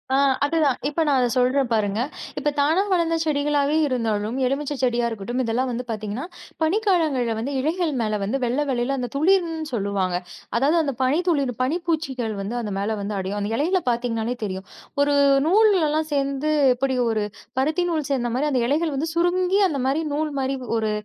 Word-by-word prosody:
ஆ - - +4 0.3
அது 325 +3 -1
தான். 275 -4 +2
இப்ப 310 +3 -1
நான் 280 - +3
அத 245 - +3
சொல்றேன் 255 +1 +2
பாருங்க. 210 -1 +1 0.4
இப்ப 295 - +1
தானா 310 +6 +3
வளந்த 335 -2 +2
செடிகளாவே 290 0 +1
இருந்தாலும், 225 -3 -1
எலுமிச்சை 285 +2 -2
செடியா 240 -1 +2
இருக்கட்டும். 230 +3 -3
இதெல்லாம் 245 +3 0
வந்து 240 +1 -3
பாத்தீங்கன்னா, 215 +5 -4 0.4
பனி 320 +6 +2
காலங்கள்ல 305 - +2
வந்து 275 +5 -3
இலைகள் 320 +4 0
மேல 215 -1 0
வந்து 215 +7 -1
வெள்ளவெள்ளேல 260 0 0
அந்த 245 - -2
துளிர்ன்னு 330 0 +2
சொல்லுவாங்க. 200 -4 -1 0.4
அதாவது 285 +7 +3
அந்தப் 275 -5 -3
பனி 270 +5 +2
துளிரும், 275 -7 0
பனி 290 +7 0
பூச்சிகள் 265 -9 -1
வந்து 205 +5 -4
அது 210 -3 -4
மேல 200 +2 -1
வந்து 205 +1 -3
அடையும். 195 +2 -3
அந்த 205 +1 -2
இலையில 350 +7 +1
பாத்தீங்கன்னாலே 235 0 -1
தெரியும். 190 0 -5 0.4
ஒரு 285 0 +3 0.3
நூல்லல்லாம் 340 -6 +3
சேந்து 280 +1 0 0.2
எப்டி 260 +1 -1
ஒரு, 220 -2 0 0.4
பருத்தி 315 +6 +1
நூல் 310 -4 -1
சேர்ந்த 240 -3 0
மாதிரி, 295 +4 +1
அந்த 255 -3 +1
இலைகள் 305 +3 +1
வந்து 315 +4 -1
சுருங்கி 360 +3 +2
அந்த 280 -7 -2
மாதிரி, 280 +4 +1
நூல் 305 0 -1
மாரி 265 0 -1 0.2
ஒரு 220 -1 0
270 Hz, 175 wpm, -23 LUFS, 235-310 Hz, 0.4 s, ஆ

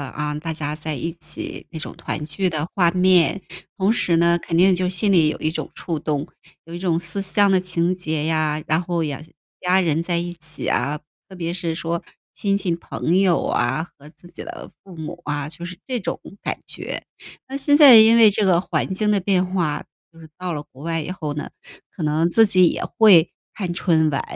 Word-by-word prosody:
啊， 150 +2 -4
大 165 +2 -5
家 150 -1 -4
在 155 0 -4
一 165 +6 -3
起 155 -2 -6
那 160 - -7
种 - - -5
团 150 - -5
聚 185 +5 -1
的 155 -2 -2
画 175 -3 +4
面， 185 0 +3 0.3
同 200 +2 +2
时 175 -7 +1
呢， 170 +1 +3
肯 165 - -3
定 185 +1 +5
就 180 0 0
心 195 +2 0
里 160 -4 +5
有 - - -2
一 155 - 0
种 160 - -5
触 165 -3 -4
动， 150 0 -2 0.4
有 165 - -12
一 - - -5
种 175 -3 0
思 170 +3 -4
乡 200 +1 +2
的 190 -1 +3
情 180 -1 0
节 160 -4 -3
呀， 155 -1 0
然 160 +2 +2
后 170 -2 -2
也 145 -1 -4 0.4
家 180 +1 +2
人 165 -1 0
在 175 0 -1
一 175 +1 -3
起 160 -2 -6
啊， 150 +1 0 0.3
特 190 - -12
别 170 -1 -3
是 170 -2 -2
说 170 +1 -3 0.3
亲 200 -1 0
戚 180 -4 -1
朋 170 +1 -1
友 185 -3 +3
啊， 130 +7 0
和 145 +2 -14
自 175 +2 -17
己 - - -9
的 - - -9
父 185 -3 -13
母 165 +2 -7
啊， 145 -1 -2
就 170 +2 -8
是 180 0 -9
这 255 -3 -2
种 - - -4 0.2
感 - - -2
觉。 - - -5 0.4
那 270 +1 -5
现 290 +1 +3
在 280 -6 +10
因 220 +1 +7
为 225 -2 +7
这 205 0 +1
个 175 -2 +4
环 190 - -2
境 210 +2 +1
的 200 - +2
变 185 -1 +1
化， 175 -5 -2 0.3
就 165 - -19
是 160 - -13
到 180 -1 -4
了 150 -1 -4
国 135 - -14
外 165 0 -2
以 - - -7
后 155 -5 -4
呢， 150 - -5 0.4
可 170 - -9
能 155 +2 +1
自 225 +6 +5
己 185 -2 +5
也 - - -3
会 185 -7 +5 0.2
看 185 -4 -3
春 160 -3 +2
晚， 140 - -1
170 Hz, 235 characters per minute, -21 LUFS, 155-185 Hz, 0.4 s, 在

